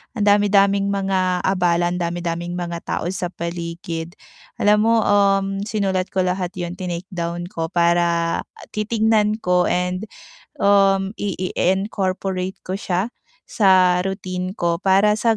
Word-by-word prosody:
ang 210 - -1
dami-daming 200 -1 +4
mga 190 -2 0
abala, 175 -2 +1
ang 180 - -3
dami-daming 170 0 -3
mga 170 -1 -4
tao - - -2
sa 180 -1 -3
paligid. 170 0 -5 0.5
Alam 210 +1 +5
mo, 230 - +4
um, 195 -1 +2
sinulat 190 -3 -1
ko 190 -1 0
lahat 180 0 -2
'yon, 175 -1 -4
tinake 180 0 -4
down 170 -1 -3
ko 165 0 -3
para 170 0 +1 0.3
titignan 215 0 +1
ko 180 0 +2
and, 180 +3 -1 0.5
um, 195 0 +3
ii-incorporate 190 -1 -2
ko 185 - -3
siya 190 0 -1 0.5
sa 185 -3 +4
routine 185 0 -4
ko, 170 0 0
para 195 +2 +4
sa 225 +1 +1
185 Hz, 130 wpm, -21 LUFS, 175-200 Hz, 0.5 s, Alam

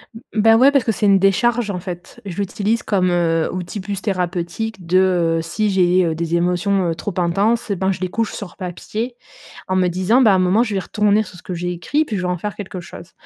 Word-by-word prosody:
M 225 - -10 0.2
ben, 225 +1 +6
ouais, 265 +4 +6
parce 275 -3 +3
que 225 - +1
c'est 215 - -1
une 200 -1 +5
décharge, 225 +4 +2
en 180 - -4
fait. 175 -1 -8
Je 185 -4 -6
l'utilise 205 +3 -1
comme, 185 -3 +1
heu, 165 -2 +1
outil, 185 +3 -5
plus 195 0 -4
thérapeutique 185 +1 -3
de, 180 +2 +2 0.4
heu, - - -1
si 205 +6 -1
j'ai, 185 -1 +3
heu, 165 -1 -1
des 170 +1 -2
émotions, 180 +2 +1
heu, 165 - -1
trop 200 +4 -5
intenses, 205 +7 +1
et 200 - 0
ben, 190 +1 +1
je 185 - -9
les 185 - -1
couche 225 +4 -2
sur 200 -4 -8
papier 210 +6 -5 0.5
en 185 - +1
me 185 -1 +3
disant: 185 +8 +2
«Ben, 225 -5 +6
à - - +4
un - - +2
moment, 185 +5 +3
je 215 -4 -3
vais 195 - 0
retourner 210 +2 +2
sur 185 - -13
ce - - -15
que 185 - -5
j'ai 175 +1 -3
écrit 220 - 0
puis 215 -8 -3
je - - -2
vais - - -1
en 180 0 -1
faire 205 +4 -5
quelque 190 -3 -7
chose». 170 -1 -12
190 Hz, 255 wpm, -19 LUFS, 180-215 Hz, 0.5 s, ben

